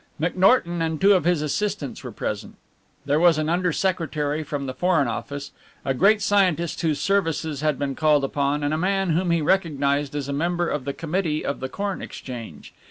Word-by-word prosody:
McNorton 175 Hz, +1 st, +3 dB
and 160 Hz, -1 st, -1 dB
two 200 Hz, +1 st, +6 dB
of 185 Hz, -4 st, +2 dB
his 175 Hz, -3 st, +2 dB
assistants 150 Hz, -3 st, -2 dB
were -, -, -6 dB
present. -, -, -5 dB, 0.5 s
There 145 Hz, +2 st, +2 dB
was 170 Hz, -2 st, +5 dB
an 155 Hz, 0 st, -1 dB
Under 180 Hz, +1 st, +1 dB
Secretary 155 Hz, -5 st, -1 dB
from 145 Hz, -2 st, -4 dB
the 130 Hz, -, -4 dB
Foreign 160 Hz, -1 st, +2 dB
Office, 140 Hz, +5 st, -5 dB, 0.3 s
a 135 Hz, -, +1 dB
great 200 Hz, +9 st, +4 dB
scientist 180 Hz, -5 st, +1 dB
whose 160 Hz, -4 st, 0 dB
services 165 Hz, -6 st, 0 dB
had 150 Hz, -3 st, +1 dB
been 140 Hz, -1 st, -2 dB
called 150 Hz, -1 st, +3 dB
upon, 140 Hz, +1 st, 0 dB
and 145 Hz, +1 st, 0 dB
a 155 Hz, -, 0 dB
man 195 Hz, 0 st, +1 dB
whom 175 Hz, +3 st, +1 dB
he 170 Hz, -2 st, +2 dB
recognized 145 Hz, -5 st, +1 dB
as 145 Hz, -2 st, -3 dB
a 140 Hz, -, -3 dB
member 175 Hz, +4 st, 0 dB
of 145 Hz, -5 st, -3 dB
the 140 Hz, -, -2 dB
Committee 165 Hz, -1 st, -2 dB
of 140 Hz, -, -2 dB
the 130 Hz, -, -4 dB
Corn 200 Hz, +3 st, -3 dB
Exchange. 115 Hz, -, -8 dB
155 Hz, 195 wpm, -24 LUFS, 145-180 Hz, 0.5 s, two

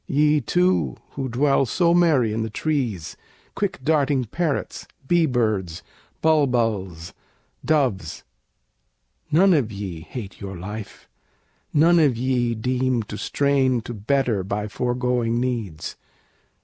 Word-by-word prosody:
Ye 150 Hz, +1 st, +3 dB
too, 180 Hz, +9 st, +1 dB
who 135 Hz, -2 st, -4 dB
dwell 135 Hz, +2 st, +2 dB
so 170 Hz, +6 st, +2 dB
merry 150 Hz, -11 st, +3 dB
in 110 Hz, -, -1 dB
the 110 Hz, -, -2 dB
trees, 120 Hz, -, -2 dB, 0.4 s
Quick 190 Hz, -8 st, -3 dB
darting 140 Hz, -3 st, +2 dB
parrots, 155 Hz, +5 st, -3 dB, 0.2 s
bee 170 Hz, 0 st, +3 dB
birds, 105 Hz, -, -1 dB, 0.4 s
bulbuls, 115 Hz, -, +1 dB, 0.5 s
doves, 125 Hz, -, 0 dB, 1.1 s
None 185 Hz, +5 st, +5 dB
of 130 Hz, -9 st, +1 dB
ye 100 Hz, -5 st, -6 dB
hate 105 Hz, +2 st, -8 dB
your 95 Hz, -2 st, -6 dB
life, 105 Hz, +4 st, -8 dB, 0.6 s
none 170 Hz, +3 st, +5 dB
of 140 Hz, -7 st, +3 dB
ye 120 Hz, -1 st, 0 dB
deem 125 Hz, +1 st, 0 dB
To 105 Hz, -, -8 dB
strain 135 Hz, 0 st, +1 dB
to 120 Hz, -, -7 dB
better 115 Hz, -1 st, 0 dB
by 105 Hz, +2 st, -3 dB
foregoing 120 Hz, 0 st, -1 dB
needs! 115 Hz, -11 st, -3 dB
125 Hz, 120 wpm, -23 LUFS, 110-145 Hz, 1.1 s, None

